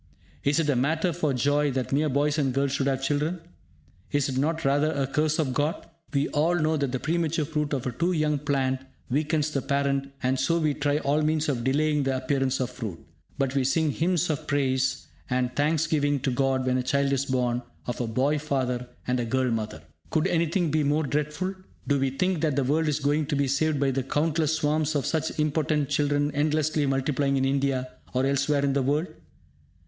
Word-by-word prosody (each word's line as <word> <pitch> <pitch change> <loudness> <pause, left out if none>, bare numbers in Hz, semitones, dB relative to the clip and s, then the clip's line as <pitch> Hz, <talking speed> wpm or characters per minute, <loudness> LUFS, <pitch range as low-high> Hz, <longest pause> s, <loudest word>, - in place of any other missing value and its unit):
Is 145 +3 +2
it 160 - +1
a 145 - +2
matter 160 +7 +1
for 155 -4 0
joy 145 +3 +2
that 130 -1 -2
mere 150 +3 +2
boys 145 +3 +1
and 135 -3 +1
girls 140 0 +1
should 140 0 0
have 135 -1 0
children? 150 +5 0 0.7
Is 145 -1 +1
it 130 - -3
not 160 +3 0
rather 145 +3 +3
a 140 -3 0
curse 150 +3 0
of 140 -5 0
God? 145 +5 -1 0.2
We 140 0 +1
all 160 +4 +2
know 160 -1 +1
that 140 -4 -1
the 130 - -1
premature 165 0 0
fruit 150 -1 -2
of 135 -3 -2
a 125 - -1
too 170 +9 0
young 155 -3 +1
plant 135 -2 0 0.3
weakens 150 +2 +1
the 140 - -1
parent, 140 0 0
and 130 +1 +1
so 170 - +2
we 155 -3 +1
try 145 0 0
all 150 0 +1
means 155 0 +1
of 125 -4 -1
delaying 150 +3 +2
the 135 -1 0
appearance 135 0 0
of 130 -1 -1
fruit. 110 -9 -5 0.4
But 135 -2 0
we 135 -1 +1
sing 155 +3 +2
hymns 175 +2 +1
of 145 - -4
praise 130 -2 0 0.2
and 125 -1 0
thanks 155 +2 +2
giving 145 -2 +1
to 135 - 0
God 130 0 +1
when 130 0 +1
a - - +1
child 140 +2 +1
is 135 0 0
born 125 -2 0 0.2
of 120 - -3
a 120 - -1
boy 135 +6 +1
father 130 -4 -1 0.2
and 125 0 0
a 120 - -1
girl 130 +1 0
mother! 110 -7 -3 0.3
Could 160 0 +1
anything 170 -2 +1
be 155 0 +2
more 145 +2 +2
dreadful? 150 +6 -2 0.3
Do 145 -1 +2
we 135 0 +1
think 180 +5 -1
that 150 -4 +1
the 140 - +2
world 155 +5 +1
is 150 -1 +1
going 145 +1 +1
to 150 - -1
be 140 0 +1
saved 145 +2 +1
by 135 -1 +2
the 135 +1 0
countless 155 +3 0
swarms 155 0 0
of 140 - 0
such 160 -1 -1
impotent 150 -1 +1
children 145 0 +1
endlessly 150 0 +1
multiplying 135 +1 +1
in 135 - +1
India 135 -1 0 0.3
or 130 +1 +2
elsewhere 140 +1 +1
in 140 - +1
the 140 - +1
world? 145 +5 +1
145 Hz, 215 wpm, -26 LUFS, 135-155 Hz, 0.7 s, rather